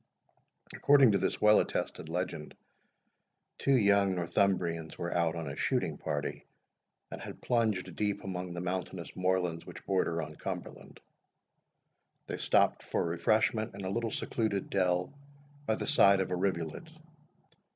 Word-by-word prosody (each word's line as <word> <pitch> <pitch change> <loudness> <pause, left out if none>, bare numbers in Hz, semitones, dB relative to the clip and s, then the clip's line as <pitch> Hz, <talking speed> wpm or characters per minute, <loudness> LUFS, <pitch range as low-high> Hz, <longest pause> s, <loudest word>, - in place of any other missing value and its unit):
According 140 -5 +5
to 100 - +2
this 95 - -1
well 105 0 +6
attested 80 - -3
legend, 90 -3 -4 1.0
two 140 - +3
young 100 -3 +3
Northumbrians 85 -2 0
were 85 0 -3
out 85 -1 +1
on 80 -2 -4
a 70 - -5
shooting - - -1
party, 75 -2 -3 0.7
and - - -7
had - - -8
plunged 110 -6 0
deep 105 -1 -1
among 90 -1 -4
the 85 - -4
mountainous 90 -1 -4
moorlands 90 -2 0
which - - -11
border 90 -3 0
on 75 -1 -5
Cumberland. - - -7 1.3
They - - -5
stopped - - +2
for - - -1
refreshment 110 +5 +1
in 100 -1 -6
a 95 - -2
little 115 +2 -1
secluded 105 -2 -2
dell 90 0 +1 0.5
by 110 - +2
the - - -4
side 100 -9 +5
of 95 -1 -1
a - - +1
rivulet. 90 - -2
95 Hz, 140 wpm, -31 LUFS, 85-100 Hz, 1.3 s, well